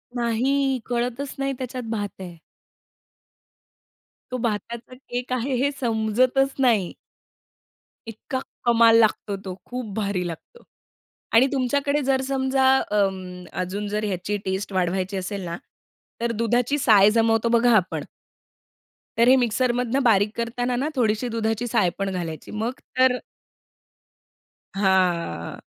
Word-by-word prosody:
नाही. 260 +3 +1
कळतच 245 +3 -2
नाही 275 0 0
त्याच्यात 255 0 -5
भात 205 -2 -2
आहे. 175 -2 -8 1.9
तो 255 - -1
भाताचा 235 +1 -4
केक 250 -1 -5
आहे 255 +2 -1
हे 285 - +2
समजतच 245 +3 +1
नाही. 225 -9 +2 1.1
इतका 230 +4 -5 0.2
कमाल 230 -1 +6
लागतो 215 -2 +1
तो. 195 -1 -7
खूप 250 0 -5
भारी 200 -4 -1
लागतो. 175 - -10 0.7
आणि 235 +4 +6
तुमच्याकडे 280 +2 +1
जर 265 0 +1
समजा 265 -1 +1 0.2
अं, 190 -3 -1 0.2
अजून 200 +3 -4
जर 210 +1 -2
ह्याची 200 +1 -2
टेस्ट 190 +1 -3
वाढवायची 185 +1 -1
असेल 195 +2 -4
ना, 170 0 -4 0.6
तर 235 0 0
दुधाची 245 +4 +1
साय 205 -2 +7
जमवतो 225 0 +3
बघा 240 0 +4
आपण 185 -3 -1 1.1
तर 235 +1 +5
हे 255 - +8
मिक्सरमधनं 245 +2 +1
बारीक 210 -3 +4
करतांना 245 +1 -1
ना 275 +5 -1
थोडीशी 225 -1 +1
दुधाची 225 +1 -1
साय 200 -5 +2
पण 195 0 -1
घालायची. 170 -4 -5
मग 220 +3 -2 0.3
तर 255 -1 +5 1.6
हां. 180 - 0
230 Hz, 120 wpm, -24 LUFS, 200-255 Hz, 1.9 s, हे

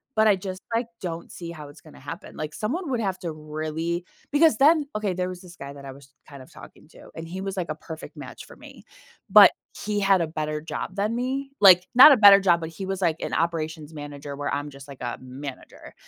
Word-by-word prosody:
but 220 0 +4
I 205 - +5
just 185 0 -7
like 235 +1 -1
don't 170 -2 -6
see 170 -1 -8
how 150 -3 -10
it's 145 - -15
gonna 155 - -16
happen. 165 +3 -9
Like 155 -1 -5
someone 280 - -3
would 245 - 0
have 190 -4 -2
to 170 -3 -5
really 155 +3 -4 0.3
because 315 +2 +4
then 295 +1 +4
okay, 210 -3 -1
there 180 0 -2
was 180 -1 -8
this 175 -1 -14
guy 140 -2 -9
that 140 -1 -12
I 135 - -7
was 135 -1 -18 0.2
kind 140 -2 -11
of - - -19
talking - - -15
to, - - -16
and 165 - -7
he 185 +3 -7
was 195 0 -4
like 175 -3 -3
a - - -4
perfect 160 0 -10
match 130 -3 -9
for - - -15
me. - - -14 0.5
But - - +9 0.3
he 210 -1 -1
had 195 -2 +3
a 165 - -1
better 155 -1 -4
job 170 +4 -6
than 210 +3 -1
me, 270 +3 -3
like, 185 -3 +7
not 265 +4 +10
a 275 - +6
better 200 -2 +9
job, 175 -3 +3
but 160 - -5
he 190 +4 -7
was 195 0 -4
like 165 -3 +2
an - - -4
operations 160 -2 -2
manager 145 -1 -8
where 145 - -4
I'm 145 +1 -3
just 140 0 -13
like 140 -2 -12
a 120 -1 -4
manager, 130 +1 -10
170 Hz, 245 wpm, -24 LUFS, 150-200 Hz, 0.5 s, not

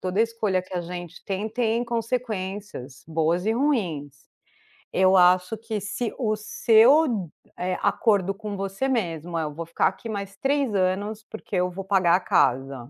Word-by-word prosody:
toda 185 +3 -1
escolha 225 -5 +1
que 185 +1 -11
a 180 - 0
gente 175 0 -8
tem, 200 +2 -3
tem 230 +1 0
consequências 210 - -4
boas 165 +3 0
e 220 - +3
ruins. 180 - -1 0.7
Eu 190 0 +4
acho 180 +3 +4
que 220 -2 -4
se 225 +3 -3
o 215 -4 0
seu, 225 - +4 0.3
eh, 180 +1 -2
acordo 200 -4 +2
com 210 0 -6
você 195 +6 -2
mesmo 175 - -2
é: 165 - 0
"Eu 150 -1 -4
vou 165 +3 -6
ficar 170 - +1
aqui 190 +4 -5
mais 200 -3 -5
3 275 -1 0
anos, 200 +3 -1
porque 220 -2 -7
eu 180 0 +1
vou 195 +2 -6
pagar 190 -3 +3
a - - +2
casa, 135 -7 +1
195 Hz, 170 wpm, -25 LUFS, 180-225 Hz, 0.7 s, Eu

